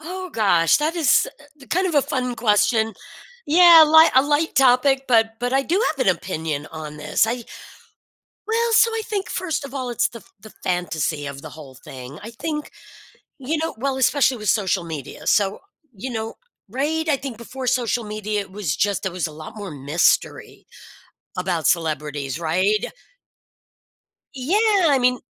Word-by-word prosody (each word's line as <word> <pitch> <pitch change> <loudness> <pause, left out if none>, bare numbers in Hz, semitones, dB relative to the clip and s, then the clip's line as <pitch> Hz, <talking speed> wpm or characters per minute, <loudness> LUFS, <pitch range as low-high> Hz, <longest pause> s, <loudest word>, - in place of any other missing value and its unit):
Oh 365 +2 -7
gosh. 185 - +3
That 315 +3 -1
is, 330 - +3 0.3
uh, - - -14
kind 370 +2 0
of 335 - -2
a 285 - +4
fun 250 -2 -2
question. 220 0 +2 0.5
Yeah, 335 0 +8
li 320 +1 +7
a 260 - +6
light 295 +2 0
topic, 265 +1 +3
but 225 -2 +3
but 245 +1 -2
I 270 0 +2
do 365 +9 0
have 275 -7 -2
an 185 - +4
opinion 155 -5 -4
on 155 -2 -8
this. 150 +8 +1
I 235 0 -3 1.0
Well, 460 +1 0
so 460 +1 +5
I 450 -1 -2
think, 400 -3 -4
first 325 -5 -3
of 275 0 -9
all, 255 -2 -3
it's 245 +1 +1
the 230 -3 -12 0.2
the 215 +1 -14
fantasy 160 -4 -2
of 140 0 -7
the - - -9
whole 140 -5 -12
thing. 130 +3 -10
I 225 - -8
think, 300 +5 -5 0.7
you 280 +5 -2
know 325 +1 -3
well, 270 +2 -1
especially 265 0 +2
with 215 -2 0
social 190 -4 0
media. 155 -5 -8
So, 200 -1 +1 0.3
you 245 +7 -6
know 225 -1 -4 0.4
Right? 315 +6 -2
I 285 - +3
think 260 -4 -7
before 255 +2 -7
social 240 -1 0
media, 210 0 -3
it 195 -1 -16
was 190 -9 -3
just 205 0 0
there 190 -2 -3
was 175 - 0
a 155 - -9
lot 155 +7 -10
more 200 -4 -7
mystery 145 +4 -1 0.7
about 170 -4 -1
celebrities, 150 -4 -1
right? 185 +6 +1 1.5
Yeah, 270 +10 0 0.3
I 280 -2 +4
mean 250 0 +2
230 Hz, 175 wpm, -21 LUFS, 180-285 Hz, 1.5 s, Yeah